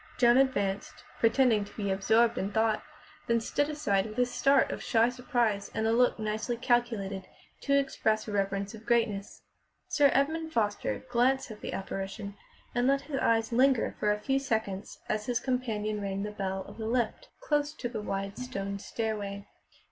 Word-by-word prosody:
Joan 240 0 +5
advanced, 205 -8 0 0.2
pretending 230 -2 +4
to 200 - -13
be 200 -2 -1
absorbed 220 +4 +3
in 195 +2 -2
thought, 220 0 +2 0.5
then 235 0 +3
stood 290 +6 0
aside 205 -10 0
with 215 - -9
a 250 - +4
start 275 +2 +3
of - - -5
shy 230 0 +3
surprise 240 -5 0
and 220 - 0
a 225 - +3
look 245 +1 +3
nicely 220 +2 -2
calculated 225 -6 0 0.3
to 280 0 +2
express 220 -6 0
reverence 200 -1 -1
of 220 0 -12
greatness. 225 -4 0 0.5
Sir 285 -2 +5
Edmund 315 +4 +1
Foster 210 -3 0
glanced 255 +1 +2
at 210 - -10
the - - -5
apparition 195 +1 -5 0.4
and 245 +1 +2
let 275 0 +3
his 280 -1 -4
eyes 225 0 +2
linger 255 0 +3
for 210 - +2
a 210 - +1
few 270 +6 0
seconds 220 -7 -2
as 215 0 -2
his 245 -2 +1
companion 215 -5 -2
rang 195 0 -2
the 210 - -4
bell 190 -2 -3
of - - -12
the 220 - -3
lift, 245 - -1
close 295 -10 0
to 260 - -4
the 230 -3 -5
wide 195 -1 -4
stone 200 -6 -4
stairway. 205 -2 -3
225 Hz, 175 wpm, -29 LUFS, 205-250 Hz, 0.5 s, Joan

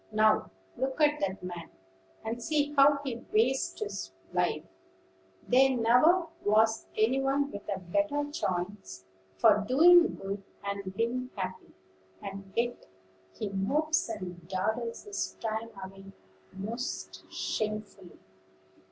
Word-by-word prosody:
Now, 215 0 +3 0.3
look 265 +3 -2
at 300 0 +4
that 190 -1 -2
man, 175 -2 -6 0.6
and 230 +2 -3
see 295 +2 0
how 280 0 +6
he 255 -5 -3
wastes 250 +5 +2
his 200 - -4 0.2
life. - - +1 0.8
There 260 +1 +5
never 250 +10 +5 0.2
was 220 +2 +3
any 240 +5 +3
one 280 +1 +1
with 205 +1 -8
a 200 - 0
better 290 - 0
chance 180 - -3 0.3
for 95 - +6
doing 340 +7 +7
good, 195 +1 -5 0.2
and 200 -1 -4
being 245 +3 -1
happy; 185 -2 -6 0.4
and 195 0 -8
yet 240 +1 -1 0.4
he 205 - -4
mopes 285 +11 +1
and 180 -5 -6
dawdles 220 +5 -2
his 410 -1 -4
time 225 0 -3
away 195 0 -10 0.5
most 225 +7 -5
shamefully." 210 -4 -4
220 Hz, 120 wpm, -30 LUFS, 195-270 Hz, 0.8 s, doing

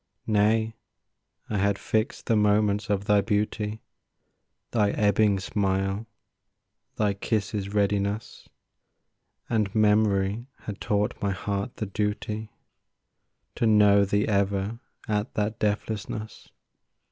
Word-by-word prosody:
Nay, 110 +1 +2 0.7
I 105 - -1
had 100 0 +2
fixed 110 +3 -1
the 115 - +2
moments 105 0 +2
of 100 -1 0
thy 105 0 +4
beauty— 105 +1 -1 0.9
Thy 105 -3 +2
ebbing 105 -1 +3
smile, 95 +2 -1 0.9
thy 105 -2 +1
kiss's 100 0 -2
readiness, 100 +1 -1 1.0
And 110 -4 0
memory 105 +1 +2
had 105 -2 -7
taught 105 +2 0
my 100 - +1
heart 100 +4 -3
the 110 - -3
duty 105 +1 -3 1.0
To 115 - +1
know 105 -2 +6
thee 100 +1 +1
ever 100 +2 0 0.3
at 105 +1 -1
that 105 +1 -1
deathlessness. 110 +1 -3
105 Hz, 105 wpm, -26 LUFS, 100-110 Hz, 1.0 s, know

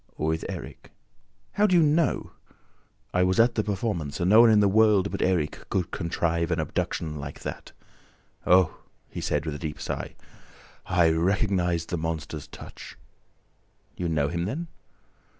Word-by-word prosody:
"With 80 +1 -1
Erik." - - -8 0.6
"How 210 +1 +3
do 185 - +3
you 170 - +6
know?" 155 +2 +1 0.8
"I 90 - +2
was 90 +2 +2
at 115 +1 +5
the 110 - 0
performance 100 -8 -3
and 90 +2 +1
no 110 +2 +9
one 120 - +7
in 110 -1 +5
the 100 - +4
world 105 -1 +4
but - - -4
Erik 85 -5 -1
could 90 -2 -1
contrive 85 -1 -1
an 85 -1 0
abduction 75 0 -2
like 70 0 -8
that!... - - -7 0.8
Oh," 90 -2 +4 0.3
he - - -6
said, 75 +1 -1
with 80 - -3
a 75 - -6
deep 75 -3 -5
sigh, - - -5 0.7
"I 85 -2 +3
recognized 90 0 0
the 85 - -2
monster's 80 -2 -4
touch! - - -11 0.5
..." - - -41
"You 90 -1 -2
know 75 -3 +1
him 85 +2 -2
then?" 160 - -4
90 Hz, 165 wpm, -26 LUFS, 80-105 Hz, 0.8 s, no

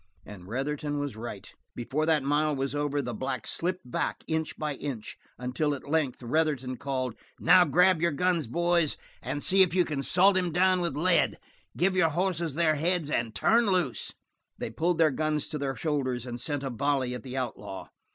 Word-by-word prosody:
And 95 -3 -11
Retherton 145 +5 -2
was 145 -4 -3
right. 110 -3 -8 0.2
Before 140 +6 -2
that 155 -4 +3
mile 150 +2 +1
was 135 0 -2
over 145 -1 -1
the 120 -1 -4
black 130 +2 -3
slipped 175 -7 -3
back - - -2
inch 160 -1 -2
by 150 -1 -2
inch, 130 -5 -6 0.2
until 125 +5 -1
at 140 - -11
length 145 -5 0
Retherton 130 -2 0
called: 130 -3 -2 0.3
"Now 180 -1 +6
grab 180 +2 +4
your 170 - +3
guns 170 -1 +1
boys 170 +3 +1 0.2
and 140 +3 -3
see 190 +1 +4
if 180 -2 +4
you 180 -2 +4
can 145 -4 -3
salt 185 +7 +4
him 180 -2 0
down 185 +2 +3
with 170 -3 -2
lead. 170 +2 +3 0.4
Give 185 +2 +2
your 170 -3 +4
hosses 170 -2 -1
their 160 -1 +3
heads 165 -1 0
and 115 -4 -1
turn 230 0 +3
loose!" 180 - 0 0.4
They - - -4
pulled 165 +7 0
their 160 -2 +4
guns 155 +1 -1
to 150 - -4
their 135 -1 -2
shoulders 130 -6 -1
and 120 -1 -5
sent 145 +1 -2
a 135 - -3
volley 130 +1 0
at 125 - -5
the 130 +3 -7
outlaw. 105 -6 -5
145 Hz, 190 wpm, -28 LUFS, 130-170 Hz, 0.4 s, Now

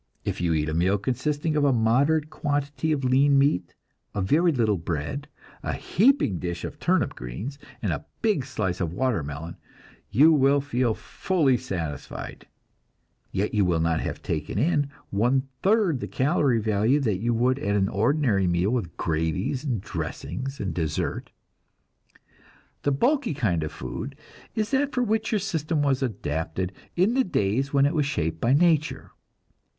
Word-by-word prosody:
If - - -2
you 85 -2 +2
eat 75 0 0
a 80 - -2
meal 90 +5 +2
consisting 145 +8 -1
of 150 - +2
a 140 - +4
moderate 140 +7 +2
quantity 145 +1 -1
of 145 -3 0
lean 135 +2 +4
meat, 90 - +1 0.4
a 100 - 0
very 165 - +3
little 110 - +1
bread, 85 - -3 0.3
a - - -2
heaping 215 - +2
dish 85 -1 -4
of - - -8
turnip - - +1
greens, 100 - -6 0.2
and - - +1
a - - -6 0.2
big 210 - +2
slice 105 -9 -2
of 85 -2 -2
watermelon, 85 - -2 0.5
you 150 +10 +6
will 140 -1 +4
feel 125 -5 0
fully 155 -9 +1
satisfied, 85 - -5 0.8
yet 100 +3 -1
you 105 -2 +3
will 90 -3 +2
not 80 0 +1
have - - -4
taken - - -3
in 145 +3 +2 0.2
one 125 +6 +2 0.2
third 195 - +3
the - - -4
calory 135 -3 +2
value 110 +5 +2
that 105 -8 0
you 120 +2 0
would 130 +3 +2
at 100 -5 0
an 95 -1 +2
ordinary 110 -2 +2
meal 85 +4 +1
with 100 -10 -2
gravies 80 - -1
and 125 -9 -1
dressings 130 - -5
and 95 -4 -2
dessert. 80 -3 -2 1.5
The 145 - +1
bulky 245 - +1
kind 95 - +1
of 75 - -3
food 135 +4 -6 0.4
is 215 -2 -1
that 280 +1 +1
for 250 - +2
which 220 -1 0
your 220 - +3
system 160 -5 -1
was 135 -2 +1
adapted 90 - -2 0.2
in 190 +6 +3
the 260 +1 +3
days 130 - 0
when 140 -1 +4
it 145 - +1
was 150 -4 +1
shaped 80 - -2
by 120 +3 +3
nature. 155 0 +2
130 Hz, 165 wpm, -25 LUFS, 95-145 Hz, 1.5 s, you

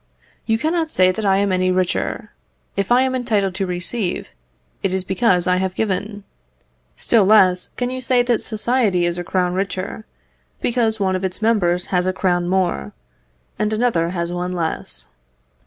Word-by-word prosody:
You 225 -1 +2
cannot 320 +4 0
say 185 -9 +4
that 205 +2 -3
I 195 0 +4
am 200 0 +1
any 185 0 +1
richer; 185 +4 -1 0.4
if 200 +3 -2
I 250 +2 +5
am 260 0 0
entitled 215 -7 0
to 190 0 -2
receive, 180 +2 -3 0.5
it 190 -1 0
is 190 - -2
because 190 -2 +2
I 180 0 +2
have 185 0 -2
given. 205 0 -2 0.7
Still 230 -3 +3
less 190 -3 +4
can 245 0 -1
you 255 0 -4
say 245 0 +2
that 240 -2 +1
society 215 -5 +1
is 175 0 -1
a - - -3
crown 180 0 0
richer, 190 +2 -3 0.5
because 230 -3 0
one 190 -2 +1
of 185 - -3
its 185 -1 -3
members 180 -6 +2
has 180 0 +2
a 185 - +1
crown 175 -2 0
more, 180 - 0 0.7
and 210 0 0
another 215 -8 +1
has 170 -1 -3
one 180 +1 -3
less. 160 - -3
190 Hz, 170 wpm, -20 LUFS, 180-220 Hz, 0.7 s, I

